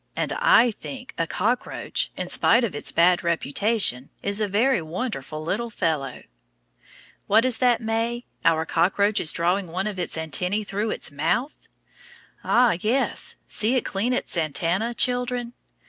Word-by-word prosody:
And -, -, -1 dB
I -, -, +5 dB
think 255 Hz, +4 st, -9 dB
a 165 Hz, -, 0 dB
cockroach, 235 Hz, +9 st, -2 dB
in -, -, -3 dB
spite 235 Hz, +2 st, +3 dB
of 225 Hz, -, -1 dB
its 145 Hz, -, -4 dB
bad 175 Hz, +2 st, +3 dB
reputation, 170 Hz, -, +1 dB
is 200 Hz, +2 st, -1 dB
a 210 Hz, -, +1 dB
very 220 Hz, +3 st, +2 dB
wonderful 160 Hz, -, -5 dB
little 215 Hz, +8 st, -2 dB
fellow. 150 Hz, -, -2 dB, 1.0 s
What 220 Hz, +4 st, +4 dB
is 250 Hz, -3 st, 0 dB
that, 245 Hz, -2 st, +3 dB
May? 230 Hz, +2 st, -2 dB, 0.2 s
Our 160 Hz, -1 st, +3 dB
cockroach 200 Hz, +6 st, +2 dB
is 155 Hz, -, +3 dB
drawing 180 Hz, +3 st, 0 dB
one 180 Hz, +4 st, -3 dB
of 205 Hz, -3 st, -4 dB
its 175 Hz, -, -2 dB
antennæ 180 Hz, +7 st, -1 dB
through 205 Hz, +3 st, -2 dB
its 160 Hz, -, -2 dB
mouth? 180 Hz, -, -1 dB, 0.9 s
Ah, 240 Hz, -7 st, +3 dB
yes, 240 Hz, +8 st, -1 dB
see 225 Hz, +4 st, +1 dB
it 255 Hz, -, 0 dB
clean 205 Hz, +6 st, -1 dB
its 250 Hz, -, 0 dB
antenna, 175 Hz, +8 st, 0 dB
children. 245 Hz, -1 st, 0 dB
205 Hz, 150 wpm, -24 LUFS, 170-235 Hz, 1.0 s, I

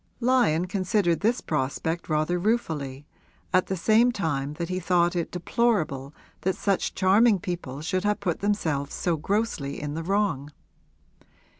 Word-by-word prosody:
Lyon 235 Hz, -10 st, +3 dB
considered 185 Hz, -2 st, +1 dB
this 230 Hz, +4 st, +1 dB
prospect 160 Hz, +4 st, -2 dB
rather 155 Hz, +3 st, +1 dB
ruefully, 155 Hz, -, -1 dB, 0.5 s
at 185 Hz, 0 st, +3 dB
the 190 Hz, -, -2 dB
same 220 Hz, +7 st, +4 dB
time 145 Hz, -, -2 dB
that 170 Hz, +2 st, -4 dB
he 185 Hz, +1 st, -2 dB
thought 175 Hz, -1 st, +2 dB
it 170 Hz, -2 st, -1 dB
deplorable 175 Hz, -, 0 dB, 0.3 s
that 190 Hz, 0 st, 0 dB
such 200 Hz, -2 st, -1 dB
charming 200 Hz, +3 st, +4 dB
people 170 Hz, -7 st, -5 dB
should 185 Hz, +4 st, -1 dB
have 210 Hz, 0 st, +1 dB
put 180 Hz, -5 st, -2 dB
themselves 160 Hz, -9 st, -1 dB
so 175 Hz, -2 st, 0 dB
grossly 160 Hz, -4 st, -2 dB
in 145 Hz, -1 st, -4 dB
the 160 Hz, -, -3 dB
wrong. 170 Hz, -6 st, 0 dB
175 Hz, 145 wpm, -26 LUFS, 155-205 Hz, 0.5 s, same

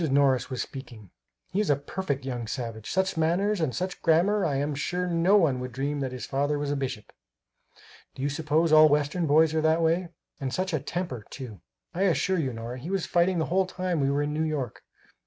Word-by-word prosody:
Morris 135 Hz, -2 st, +3 dB
was 130 Hz, -2 st, -2 dB
speaking: 120 Hz, -8 st, -10 dB, 0.4 s
"He 190 Hz, -, 0 dB
is 210 Hz, -, +1 dB
a 145 Hz, -, +5 dB
perfect 140 Hz, -1 st, -4 dB
young 120 Hz, -3 st, -4 dB
savage! 115 Hz, -2 st, -5 dB
Such 190 Hz, -2 st, 0 dB
manners, 175 Hz, +5 st, +1 dB
and 135 Hz, -6 st, 0 dB
such 185 Hz, 0 st, -3 dB
grammar 185 Hz, +5 st, +3 dB
I 145 Hz, -4 st, 0 dB
am 145 Hz, +2 st, -1 dB
sure 175 Hz, +6 st, -2 dB
no 175 Hz, +3 st, +3 dB
one 150 Hz, -10 st, +2 dB
would 125 Hz, 0 st, -5 dB
dream 140 Hz, +3 st, -2 dB
that 135 Hz, -2 st, -2 dB
his 125 Hz, -3 st, -6 dB
father 145 Hz, +2 st, 0 dB
was 145 Hz, 0 st, -2 dB
a -, -, 0 dB
bishop. 130 Hz, -6 st, -5 dB, 1.0 s
Do 135 Hz, -, -6 dB
you 140 Hz, -, +1 dB
suppose 155 Hz, +2 st, +1 dB
all 155 Hz, 0 st, +8 dB
Western 150 Hz, +4 st, +1 dB
boys 155 Hz, +2 st, +4 dB
are 160 Hz, -, +1 dB
that 160 Hz, +1 st, +3 dB
way? 170 Hz, +2 st, +1 dB, 0.3 s
And 135 Hz, -2 st, -3 dB
such 185 Hz, +4 st, -2 dB
a 155 Hz, -, +1 dB
temper, 135 Hz, -, -4 dB
too! 115 Hz, -, -8 dB, 0.3 s
I 180 Hz, -, -3 dB
assure 190 Hz, 0 st, +2 dB
you, 135 Hz, -5 st, -1 dB
Nora, 115 Hz, +2 st, -6 dB
he 150 Hz, +8 st, -7 dB
was 195 Hz, -2 st, -1 dB
fighting 175 Hz, +1 st, +2 dB
the 160 Hz, -, +1 dB
whole 190 Hz, 0 st, +3 dB
time 185 Hz, -2 st, -2 dB
we 135 Hz, -1 st, +2 dB
were 140 Hz, +1 st, +1 dB
in 150 Hz, 0 st, -2 dB
New 155 Hz, -, -1 dB
York. 150 Hz, -7 st, -2 dB
150 Hz, 220 wpm, -27 LUFS, 135-175 Hz, 1.0 s, all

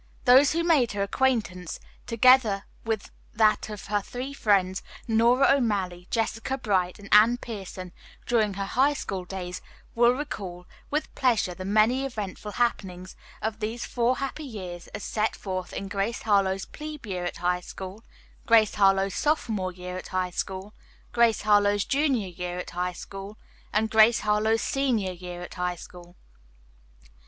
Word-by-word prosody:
Those 265 Hz, +3 st, +7 dB
who 335 Hz, +1 st, 0 dB
made 295 Hz, -10 st, +3 dB
her 200 Hz, -1 st, 0 dB
acquaintance, 200 Hz, -6 st, -1 dB, 0.3 s
together 235 Hz, -4 st, +5 dB, 0.2 s
with 220 Hz, -3 st, -3 dB, 0.2 s
that 215 Hz, -1 st, +3 dB
of 210 Hz, -2 st, -7 dB
her 205 Hz, 0 st, 0 dB
three 255 Hz, +6 st, -6 dB
friends, 195 Hz, -7 st, +2 dB, 0.3 s
Nora 240 Hz, +4 st, +4 dB
O'Malley, 195 Hz, -9 st, 0 dB
Jessica 225 Hz, +3 st, -1 dB
Bright 190 Hz, -7 st, 0 dB
and 205 Hz, -, -12 dB
Anne 220 Hz, +4 st, +7 dB
Pierson, 195 Hz, -6 st, -7 dB, 0.3 s
during 215 Hz, -4 st, +1 dB
her 200 Hz, 0 st, -2 dB
high 270 Hz, +8 st, +2 dB
school 190 Hz, -8 st, -4 dB
days 180 Hz, -1 st, -6 dB, 0.3 s
will 240 Hz, +1 st, +5 dB
recall 195 Hz, -11 st, -6 dB, 0.2 s
with 300 Hz, +1 st, -2 dB
pleasure 235 Hz, -8 st, +1 dB
the 185 Hz, +2 st, -7 dB
many 220 Hz, +6 st, +3 dB
eventful 210 Hz, -5 st, -5 dB
happenings 185 Hz, -6 st, -2 dB, 0.3 s
of 220 Hz, 0 st, -2 dB
these 225 Hz, +2 st, -3 dB
four 245 Hz, +1 st, +1 dB
happy 275 Hz, +3 st, -4 dB
years 185 Hz, -9 st, -7 dB
as 205 Hz, -, -8 dB
set 215 Hz, 0 st, -1 dB
forth 185 Hz, -2 st, -5 dB
in 195 Hz, -, -5 dB
"Grace 200 Hz, +3 st, -2 dB
Harlowe's 195 Hz, -3 st, +2 dB
Plebe 300 Hz, -3 st, -8 dB
Year 185 Hz, -4 st, -3 dB
at 175 Hz, -, -4 dB
High 180 Hz, 0 st, 0 dB
School," 190 Hz, +4 st, -9 dB, 0.4 s
"Grace 225 Hz, -2 st, +5 dB
Harlowe's 195 Hz, -1 st, +3 dB
Sophomore 220 Hz, -11 st, 0 dB
Year 180 Hz, 0 st, -7 dB
at 185 Hz, -, -7 dB
High 185 Hz, -1 st, -1 dB
School," 190 Hz, +3 st, -4 dB, 0.4 s
"Grace 235 Hz, -2 st, +3 dB
Harlowe's 205 Hz, -1 st, +3 dB
Junior 270 Hz, -8 st, +1 dB
Year 180 Hz, 0 st, -5 dB
at 180 Hz, -, -6 dB
High 180 Hz, +1 st, -2 dB
School" 195 Hz, +4 st, -9 dB, 0.3 s
and 220 Hz, +1 st, +1 dB
"Grace 220 Hz, +2 st, +6 dB
Harlowe's 215 Hz, +1 st, +2 dB
Senior 245 Hz, -9 st, 0 dB
Year 175 Hz, 0 st, -8 dB
at -, -, -9 dB
High 180 Hz, 0 st, -2 dB
School." 175 Hz, 0 st, -13 dB
210 Hz, 155 wpm, -26 LUFS, 185-235 Hz, 0.4 s, Those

